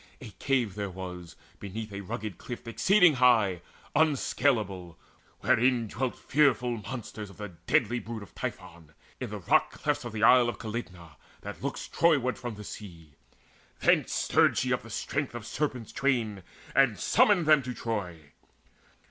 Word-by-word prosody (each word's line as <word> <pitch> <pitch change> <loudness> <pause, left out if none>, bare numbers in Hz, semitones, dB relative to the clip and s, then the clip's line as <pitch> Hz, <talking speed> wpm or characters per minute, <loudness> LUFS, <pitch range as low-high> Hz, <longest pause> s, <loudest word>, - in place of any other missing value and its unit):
A 120 -6 -10
cave 125 -7 +1
there 100 0 -4
was, 90 -3 -8 0.2
beneath 105 +1 -6
a 100 - -5
rugged 100 0 -6
cliff 120 -1 -8
Exceeding 180 - +4
high, 110 -8 +4 0.3
unscalable, 110 - +1 0.4
wherein 120 0 +3
Dwelt 125 +4 -3
fearful 130 -5 +2
monsters 110 -2 -7
of 100 - -15
the 105 0 -6 0.2
deadly 120 0 +2
brood 115 -2 -7
Of 95 - -15
Typhon, 80 -2 -7 0.3
in - - -4
the - - -5
rock - - +2
clefts - - 0
of 120 - -6
the 110 0 -3
isle 120 0 +6
Calydna 90 - -7 0.2
that - - -8
looks - - -4
Troyward 135 -9 +2
from 120 -3 -5
the 105 - -9
sea. 85 -8 -10 0.7
Thence - - +3
stirred - - +3
she - - +1
up - - -1
the - - -13
strength 140 -3 -3
of 120 -2 -6
serpents 125 -4 -3
twain, 115 -8 0 0.3
And 125 -8 +3
summoned 190 - +4
them 155 -1 +6
to 125 -1 -5
Troy. 90 -10 -5
115 Hz, 155 wpm, -28 LUFS, 100-130 Hz, 0.7 s, isle